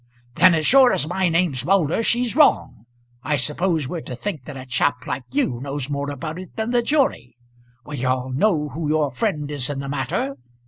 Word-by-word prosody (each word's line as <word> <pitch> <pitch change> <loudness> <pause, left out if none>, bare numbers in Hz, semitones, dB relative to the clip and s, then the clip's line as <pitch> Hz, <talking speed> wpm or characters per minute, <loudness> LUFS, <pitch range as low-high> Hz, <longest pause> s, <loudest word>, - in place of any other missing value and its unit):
"Then 180 +5 +5
as 155 -1 -1
sure 265 -2 +6
as 145 - 0
my 185 +1 0
name's 165 -7 +1
Moulder 175 +2 +2
she's 240 +1 0
wrong. 290 - +3 0.4
I 150 - 0
suppose 150 +3 0
we're 170 +3 -4
to 125 - -7
think 155 -2 -5
that 145 -3 -8
a 130 - -8
chap 125 0 0
like 125 0 -4
you 125 -3 -1
knows 140 0 -4
more 140 0 -2
about 155 +4 -5
it 185 - -11
than 220 +1 -2
the 245 -1 +3
jury! 235 - 0 0.5
We 145 -4 -6
all 130 0 -1
know 150 +1 +1
who 155 +3 -4
your 150 -2 +1
friend 150 - -2
is 140 -3 -2
in 145 - -3
the 140 0 -5
matter. 135 0 -2
150 Hz, 200 wpm, -22 LUFS, 130-180 Hz, 0.5 s, sure